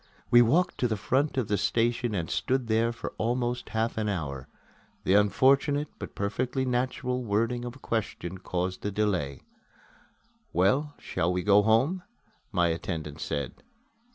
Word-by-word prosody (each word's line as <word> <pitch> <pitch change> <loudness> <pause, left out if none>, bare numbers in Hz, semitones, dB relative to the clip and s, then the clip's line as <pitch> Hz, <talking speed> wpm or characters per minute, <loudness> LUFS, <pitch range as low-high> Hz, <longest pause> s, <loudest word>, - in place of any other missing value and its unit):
We 120 - +8
walked 155 +10 +2
to 125 - +2
the 110 -2 -1
front 130 +8 0
of 125 -5 +1
the 105 -2 0
station 115 +1 +1
and 85 -4 -2
stood 130 -1 0
there 115 +1 +2
for 115 - -6
almost 120 +1 -1
half 110 0 -1
an 105 -1 0
hour. 70 -8 -3 0.6
The 95 - +2
unfortunate, 135 - +3
but - - -7
perfectly 125 +6 -1
natural, 125 0 -1
wording 115 +3 0
of 120 0 -6
a 135 - -16
question 95 -5 -3
caused 90 0 -3
the 105 - -2
delay. 95 -10 -1 1.1
"Well, 130 - +2
shall 85 +2 -1
we 90 0 -1
go 100 0 +6
home?" 120 - +2 0.5
my 90 -4 +2
attendant 80 -2 -4
said. 70 -3 -4
110 Hz, 155 wpm, -28 LUFS, 95-125 Hz, 1.1 s, We